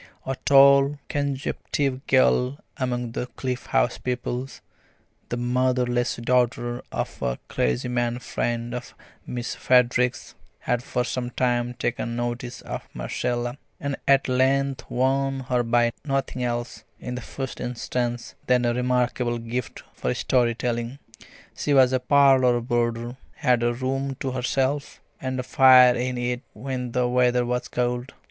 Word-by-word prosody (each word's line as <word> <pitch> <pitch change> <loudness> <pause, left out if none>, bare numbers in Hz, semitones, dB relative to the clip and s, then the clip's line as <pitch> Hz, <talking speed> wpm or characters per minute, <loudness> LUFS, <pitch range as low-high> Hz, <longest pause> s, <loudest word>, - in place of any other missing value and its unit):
A 135 - -2
tall, 140 +1 +6
consumptive 140 -1 -2
girl 130 0 +3 0.2
among 125 -2 -2
the 125 - -3
Cliff 125 0 -5
House - - +1
pupils, 125 +1 -4 0.7
the 120 - -2
motherless 125 0 +1
daughter 120 0 0
of - - -4
a - - -1
clergyman 120 - 0
friend 120 -1 -3
of 125 - -7 0.3
Miss 120 0 -4
Frederick's, 125 0 +2 0.3
had 125 -1 0
for 125 0 -1
some 125 0 -3
time 125 -1 0
taken 120 -1 -2
notice 120 +1 -4
of - - -7
Marcella, 120 - -2 0.2
and 140 -1 -2
at 135 0 +4
length 135 +1 +1
won 135 +1 +1
her 125 -1 0
by 120 0 +2
nothing 135 -3 -2
else, 120 -2 -3 0.2
in 125 - -5
the 125 - -4
first 130 +2 -6
instance, 120 0 -3
than 125 -1 +3
a 120 - +2
remarkable 125 -1 0
gift 115 +1 -5
for 65 - -2
story 120 -3 +2
telling. 120 +1 -2 0.6
She 145 - 0
was 130 -1 +5
a 130 - +3
parlour 130 -2 +4
boarder, 120 0 -1 0.2
had 125 -2 +2
a 120 0 +2
room 135 +2 -2
to 135 - -1
herself, 130 +3 -1 0.2
and 130 0 -3
a - - -1
fire 130 -2 +7
in 125 +1 -2
it 120 0 -2
when 125 +1 -4
the 125 -1 +2
weather 125 0 +2
was 125 +1 -2
cold. 125 +1 -2
125 Hz, 140 wpm, -24 LUFS, 120-130 Hz, 0.7 s, fire